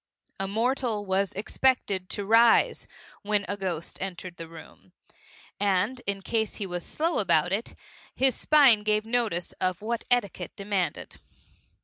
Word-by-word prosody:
A 195 - -2
mortal 225 0 -1
was 195 0 0
expected 200 -3 0
to 205 - -4
rise 230 +2 +4 0.3
when 205 -1 0
a 205 - -2
ghost 180 -5 -4
entered 185 -2 -6
the 165 - -8
room, 160 - -14 0.7
and 205 +5 +1
in 200 -1 -2
case 220 -1 -1
he 205 - -4
was 175 -2 -5
slow 330 +2 -1
about 175 -3 +2
it, 205 +4 -2 0.4
his 265 -1 +3
spine 270 -6 +5
gave 215 0 +1
notice 225 -7 -1
of 185 +1 -1
what 230 +1 -3
etiquette 200 -7 0
demanded. 200 -3 -3
205 Hz, 140 wpm, -27 LUFS, 185-230 Hz, 0.7 s, spine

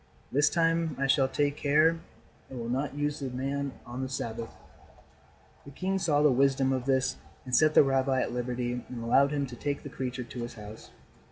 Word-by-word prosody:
This 145 +3 +4
time 165 -2 +1
I 135 - 0
shall 135 0 +3
take 145 +1 0
care 155 +3 +3 0.5
and 130 - -7
will 115 0 -4
not 135 +3 -2
use 145 0 -1
the 135 -2 -3
man 135 +2 -2
on 120 +2 -6
the 130 - -3
Sabbath." 115 -3 -4 1.1
The - - -11
king 190 +7 -2
saw 150 -5 +2
the 150 - +6
wisdom 135 0 +3
of 130 -2 -2
this 130 -1 +1 0.3
and 125 -1 0
set 155 +3 +4
the - - +8
rabbi 135 -1 +1
at - - -1
liberty 125 0 -2
and 120 -2 -6
allowed 135 +4 +4
him 145 -1 0
to 125 -2 -9
take 140 +3 -3
the - - -7
creature 125 -1 -4
to 120 +1 -9
his 120 0 -6
house. 105 0 -10
135 Hz, 200 wpm, -29 LUFS, 125-145 Hz, 1.1 s, the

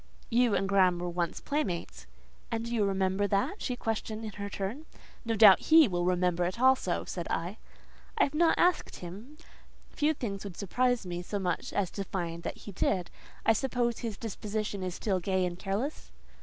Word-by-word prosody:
"You 235 -2 +4
and 195 - +1
Graham 190 -3 +4
were 175 +1 -3
once 170 -1 -2
playmates." 200 - -3 0.4
"And 230 0 -2
do 235 - -4
you 215 -3 +2
remember 190 +1 +1
that?" 200 - 0
she 250 - -2
questioned 225 -1 -3
in 215 - -5
her 200 0 -6
turn. 210 +11 -5 0.4
"No 225 0 0
doubt 210 -3 +8
he 320 -2 +8
will 175 -3 -1
remember 180 -1 +2
it 185 +6 -3
also," 260 -8 +3
said 175 -2 -5
I. 175 +6 -3 0.6
"I - - +5
have 280 - 0
not 325 +2 +3
asked 355 0 +2
him: 205 - -9 0.5
few 305 +1 +1
things 200 -7 -4
would 195 -4 -8
surprise 245 +3 +1
me 175 -1 -4
so 205 +3 -4
much 180 -3 -2
as 195 -3 -1
to 200 - -4
find 170 -3 -4
that - - -5
he 205 - -9
did. 180 -1 -1 0.3
I 225 - +6
suppose 240 -1 0
his 225 -4 -4
disposition 210 -2 -4
is 185 -1 -3
still 195 -4 0
gay 185 +1 0
and 175 0 -4
careless?" 205 +10 -3
200 Hz, 190 wpm, -30 LUFS, 180-235 Hz, 0.6 s, doubt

